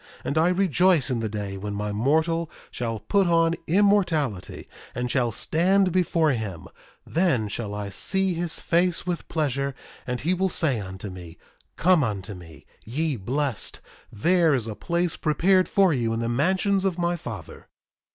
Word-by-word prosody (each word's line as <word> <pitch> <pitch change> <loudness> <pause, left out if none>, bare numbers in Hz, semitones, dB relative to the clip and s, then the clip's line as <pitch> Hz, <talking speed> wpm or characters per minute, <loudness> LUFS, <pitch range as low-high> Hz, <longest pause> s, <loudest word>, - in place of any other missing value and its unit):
And 140 - -2
I 160 +2 +4
rejoice 180 -4 +3
in 120 - 0
the 110 -1 -2
day 100 -2 -4
when 100 +1 -5
my 105 0 -3
mortal 160 +9 +1 0.2
shall 115 -3 -3
put 195 - +2
on 165 -1 +3
immortality, 170 - +1 0.3
and 125 0 -2
shall 120 -3 +1
stand 185 - +2
before 165 -3 +2
him; 110 -8 -4 0.4
then 165 - +1
shall 105 0 -4
I 105 -1 -4
see 190 - 0
his 170 0 -2
face 170 0 +1
with 175 -2 -3
pleasure, 140 -3 -1 0.3
and 125 0 -2
he 170 +6 +1
will 190 +1 +1
say 145 -9 0
unto 95 0 -7
me: 90 -2 -10 0.4
Come 175 -2 +4
unto 100 -3 -3
me, 85 -4 -13 0.2
ye 150 +6 -1
blessed, 125 +3 -2 0.3
there 165 - +3
is 115 -4 -1
a 110 - -4
place 170 +8 -1
prepared 185 +5 +2
for 195 -4 +4
you 115 -4 0
in 115 - -2
the 115 - -1
mansions 190 - +1
of 190 -3 0
my 175 0 0
Father. 115 - -8
150 Hz, 165 wpm, -25 LUFS, 110-175 Hz, 0.4 s, I